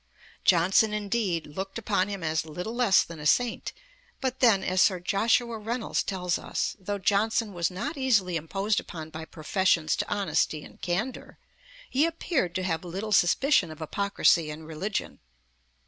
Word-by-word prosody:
Johnson, 190 +5 +4
indeed, 200 -5 -1
looked 190 +8 -6
upon 205 -4 0
him 200 -3 -5
as 160 0 0
little 180 +8 -6
less 240 -6 +4
than 170 -2 -10
a 150 - -1
saint; 245 +9 +1 0.5
but 260 -1 -2
then, 220 -6 +4
as 185 0 +1
Sir 185 -3 +4
Joshua 225 +5 +1
Reynolds 230 +2 -2
tells 180 -3 -2
us, - - -2
though 200 +2 -3
'Johnson 210 +2 +1
was 170 -1 0
not 275 - -4
easily 215 -10 +2
imposed 195 +6 0
upon 160 -2 -8
by 160 +1 -7
professions 165 0 +1
to - - -2
honesty 170 -6 0
and - - -15
candour, 205 +9 -3 0.5
he 285 +5 +2
appeared 325 - -1
to 185 - -1
have 165 -3 -1
little 190 +5 -5
suspicion 195 - +3
of 155 - -9
hypocrisy 170 -1 +2
in 150 +1 -7
religion.' 165 +6 -4
190 Hz, 160 wpm, -27 LUFS, 170-220 Hz, 0.5 s, Johnson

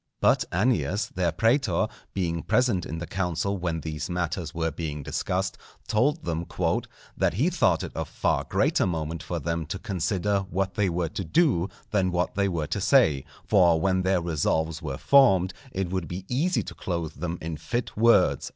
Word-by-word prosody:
But - - +3
Annius, 95 - +1
their 90 -2 +1
prætor, 110 - +2 0.3
being 85 -3 -1
present 120 -7 +1
in 80 - -5
the 85 - -4
council 95 +2 -2
when 85 -2 -2
these 80 +1 -4
matters 90 -1 -2
were 80 -1 -1
being 75 -3 -5
discussed, - - -2 0.3
told 140 +8 +1
them 85 0 -1
"_that - - -2
he - - +1
thought - - +2
it - - -7
of - - -3
far - - 0
greater - - +2
moment 80 -1 -3
for 85 - -4
them 80 0 -2
to 95 - -3
consider 100 0 -1
what 95 +2 -1
they 100 0 +1
were 85 -1 -1
to 95 - -4
do 100 - +2 0.2
than 95 -3 +2
what 90 0 0
they 100 0 +1
were 85 -5 -1
to - - -3
say; 70 -4 +4 0.2
for 85 -5 +4
when 95 +2 +2
their 95 -1 +2
resolves 80 0 0
were 70 -4 -4
formed, 95 -10 +5 0.2
it 95 -2 -3
would 95 -3 -2
be 90 +2 -6
easy 160 +9 +1
to - - -8
clothe 85 -4 -3
them 85 +1 -3
in 80 0 -4
fit 120 +9 -3
words_." 115 +2 +4
90 Hz, 180 wpm, -26 LUFS, 80-100 Hz, 0.3 s, formed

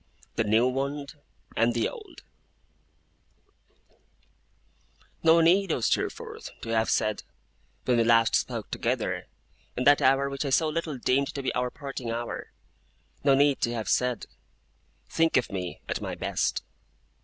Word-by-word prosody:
THE - - +2
NEW 110 +4 +4
WOUND, 140 +2 -3 0.4
AND 115 +1 +2
THE 115 - +1
OLD - - -11 3.0
No 165 +1 +6
need, 180 +3 +4
O - - 0
Steerforth, 110 - -2
to 115 - -7
have 115 0 +1
said, 110 -1 +1 0.6
when 125 -1 +3
we 115 - +4
last 115 -1 +4
spoke - - -1
together, - - -2 0.5
in 125 - 0
that 145 +1 +6
hour 135 +1 +4
which 140 +1 -3
I 140 - -2
so 155 +4 +3
little 155 -2 -3
deemed 135 +3 +1
to 140 - -4
be - - -1
our 125 0 0
parting 135 -3 -6
hour 120 +1 -4 0.7
no 140 -1 +5
need 140 0 +3
to 120 0 0
have 110 -2 -4
said, 125 -3 +1 0.8
'Think 165 -2 +2
of 125 - 0
me 90 -2 -5
at - - -3
my - - -4
best! - - -1
130 Hz, 145 wpm, -27 LUFS, 115-145 Hz, 3.0 s, No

